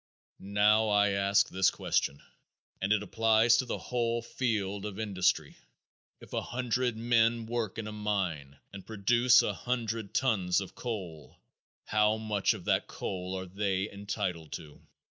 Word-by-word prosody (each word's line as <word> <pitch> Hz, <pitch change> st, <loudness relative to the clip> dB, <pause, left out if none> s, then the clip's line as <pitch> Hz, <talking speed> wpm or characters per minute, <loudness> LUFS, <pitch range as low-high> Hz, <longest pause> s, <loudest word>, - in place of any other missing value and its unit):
Now, 105 Hz, +2 st, +3 dB
I 105 Hz, 0 st, +4 dB
ask 100 Hz, 0 st, +2 dB
this 95 Hz, 0 st, +2 dB
question, 70 Hz, 0 st, -1 dB, 0.6 s
and 95 Hz, +2 st, 0 dB
it 105 Hz, -1 st, +3 dB
applies 115 Hz, +2 st, +4 dB
to 130 Hz, -, 0 dB
the -, -, -2 dB
whole 120 Hz, -1 st, -1 dB
field 105 Hz, -5 st, -2 dB
of 105 Hz, -2 st, -6 dB
industry: 100 Hz, -4 st, 0 dB, 0.6 s
If -, -, -14 dB
a -, -, 0 dB
hundred 125 Hz, -1 st, -1 dB
men 115 Hz, 0 st, +2 dB
work 115 Hz, -3 st, -3 dB
in 115 Hz, -, -4 dB
a 105 Hz, -, -5 dB
mine 95 Hz, -10 st, -3 dB, 0.2 s
and 100 Hz, -1 st, -8 dB
produce 120 Hz, +4 st, +4 dB
a -, -, -1 dB
hundred 115 Hz, -4 st, -3 dB
tons 95 Hz, -9 st, +2 dB
of 95 Hz, -, -7 dB
coal, 95 Hz, -, -6 dB, 0.5 s
how 105 Hz, 0 st, +2 dB
much 105 Hz, -2 st, 0 dB
of -, -, -10 dB
that -, -, +1 dB
coal 95 Hz, 0 st, -4 dB
are 95 Hz, -, -5 dB
they 95 Hz, +1 st, -2 dB
entitled 100 Hz, -5 st, -4 dB
to? 75 Hz, -3 st, -9 dB
105 Hz, 150 wpm, -30 LUFS, 95-115 Hz, 0.6 s, I